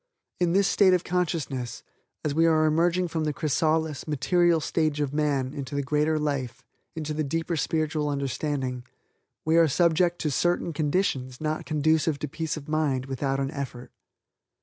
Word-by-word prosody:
In 175 Hz, -1 st, +2 dB
this 195 Hz, +1 st, +4 dB
state 190 Hz, -3 st, +5 dB
of 180 Hz, -, -1 dB
consciousness, 150 Hz, -9 st, -2 dB, 0.4 s
as 150 Hz, -, 0 dB
we 165 Hz, +2 st, +4 dB
are 155 Hz, -1 st, +4 dB
emerging 170 Hz, +3 st, +2 dB
from 160 Hz, -1 st, -2 dB
the 150 Hz, -1 st, -1 dB
chrysalis, 155 Hz, +1 st, 0 dB
material 170 Hz, +3 st, +2 dB
stage 155 Hz, -1 st, 0 dB
of 145 Hz, -2 st, -1 dB
man 145 Hz, -3 st, 0 dB
into 140 Hz, -2 st, -5 dB
the 140 Hz, -, 0 dB
greater 150 Hz, +3 st, +1 dB
life, 140 Hz, -5 st, -2 dB, 0.3 s
into 155 Hz, -1 st, -3 dB
the 155 Hz, +1 st, -1 dB
deeper 165 Hz, +4 st, -2 dB
spiritual 155 Hz, -1 st, 0 dB
understanding, 135 Hz, -2 st, -2 dB, 0.6 s
we 160 Hz, +1 st, +3 dB
are 165 Hz, -1 st, +6 dB
subject 170 Hz, +3 st, +2 dB
to 150 Hz, -, 0 dB
certain 175 Hz, +2 st, 0 dB
conditions 145 Hz, -5 st, -1 dB
not 155 Hz, 0 st, -3 dB
conducive 155 Hz, 0 st, +2 dB
to 150 Hz, -, -4 dB
peace 160 Hz, +2 st, -3 dB
of 145 Hz, -, -9 dB
mind 150 Hz, -4 st, 0 dB
without 135 Hz, 0 st, -2 dB
an 135 Hz, 0 st, -1 dB
effort. 130 Hz, -3 st, -6 dB
155 Hz, 165 wpm, -26 LUFS, 140-165 Hz, 0.6 s, are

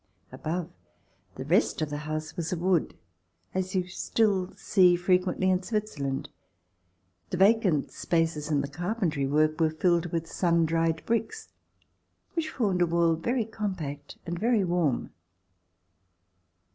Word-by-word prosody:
Above, 170 Hz, +2 st, -4 dB, 0.6 s
the -, -, -6 dB
rest -, -, +2 dB
of 155 Hz, -1 st, -2 dB
the 145 Hz, -, -2 dB
house 155 Hz, 0 st, -4 dB
was 170 Hz, -1 st, -3 dB
of 180 Hz, -, -1 dB
wood, 180 Hz, -2 st, +1 dB, 0.6 s
as 185 Hz, 0 st, -2 dB
you 185 Hz, -, +3 dB
will 180 Hz, -, -9 dB
still 190 Hz, 0 st, 0 dB
see 185 Hz, -4 st, +4 dB
frequently 180 Hz, +1 st, +1 dB
in 185 Hz, -1 st, +3 dB
Switzerland. 180 Hz, -11 st, -3 dB, 1.0 s
The 180 Hz, -, -2 dB
vacant 195 Hz, -6 st, +3 dB
spaces 165 Hz, -3 st, -1 dB
in 145 Hz, -2 st, +2 dB
the 140 Hz, -, -3 dB
carpentry 170 Hz, -3 st, -1 dB
work 155 Hz, +3 st, +2 dB
were 160 Hz, -, +4 dB
filled 170 Hz, +2 st, +1 dB
with 165 Hz, -1 st, -2 dB
sun 170 Hz, -1 st, +1 dB
dried 165 Hz, 0 st, 0 dB
bricks 230 Hz, -, -2 dB, 0.8 s
which 330 Hz, -2 st, -1 dB
formed 200 Hz, -10 st, 0 dB
a 175 Hz, -, +4 dB
wall 170 Hz, 0 st, +3 dB
very 235 Hz, +8 st, -1 dB
compact 180 Hz, -10 st, -5 dB
and 170 Hz, 0 st, -4 dB
very 230 Hz, -2 st, +2 dB
warm. 175 Hz, -7 st, 0 dB
175 Hz, 140 wpm, -28 LUFS, 160-190 Hz, 1.0 s, see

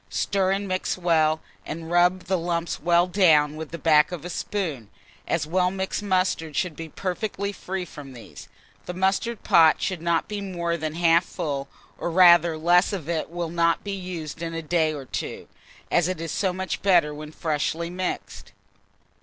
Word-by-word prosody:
Stir 190 Hz, -, 0 dB
and 195 Hz, +1 st, -1 dB
mix 185 Hz, 0 st, -1 dB
well, 160 Hz, -3 st, +2 dB, 0.2 s
and 165 Hz, +1 st, -7 dB
rub 175 Hz, +1 st, +3 dB
the 190 Hz, -, 0 dB
lumps 170 Hz, 0 st, -2 dB
well 175 Hz, 0 st, +4 dB
down 160 Hz, -6 st, +4 dB
with 160 Hz, -1 st, -6 dB
the 170 Hz, -, -6 dB
back 155 Hz, -1 st, +4 dB
of 175 Hz, -2 st, -6 dB
a 180 Hz, -, -5 dB
spoon, 155 Hz, -, -3 dB, 0.4 s
as 165 Hz, -2 st, 0 dB
well 180 Hz, +3 st, +1 dB
mixed 190 Hz, +2 st, -3 dB
mustard 185 Hz, -6 st, 0 dB
should 180 Hz, -4 st, -1 dB
be 165 Hz, +1 st, -7 dB
perfectly 200 Hz, +4 st, -3 dB
free 190 Hz, -1 st, -5 dB
from 145 Hz, -5 st, -11 dB
these. 120 Hz, -2 st, -12 dB, 0.4 s
The 180 Hz, -, -5 dB
mustard 195 Hz, +5 st, 0 dB
pot 160 Hz, -2 st, +5 dB
should 185 Hz, -4 st, -2 dB
not 170 Hz, -1 st, 0 dB
be 210 Hz, -1 st, -4 dB
more 170 Hz, -3 st, -2 dB
than 155 Hz, -1 st, -4 dB
half 170 Hz, 0 st, +4 dB
full, 145 Hz, -7 st, -4 dB, 0.3 s
or -, -, -2 dB
rather 170 Hz, -2 st, +6 dB
less 175 Hz, +5 st, +3 dB
if 170 Hz, -7 st, -4 dB
it 165 Hz, -2 st, -2 dB
will 170 Hz, -1 st, -4 dB
not 170 Hz, 0 st, +1 dB
be 200 Hz, -, -4 dB
used 175 Hz, -5 st, -6 dB
in 165 Hz, -1 st, -4 dB
a 165 Hz, -, -4 dB
day 160 Hz, 0 st, +1 dB
or 145 Hz, -3 st, -6 dB
two, -, -, -5 dB, 0.4 s
as 175 Hz, -1 st, +3 dB
it 185 Hz, -3 st, -3 dB
is 165 Hz, -2 st, -4 dB
so 190 Hz, +2 st, 0 dB
much 185 Hz, +1 st, -4 dB
better 175 Hz, -6 st, +3 dB
when 150 Hz, +1 st, -8 dB
freshly 160 Hz, +2 st, -2 dB
mixed. 185 Hz, 0 st, -5 dB
170 Hz, 185 wpm, -24 LUFS, 160-185 Hz, 0.4 s, rather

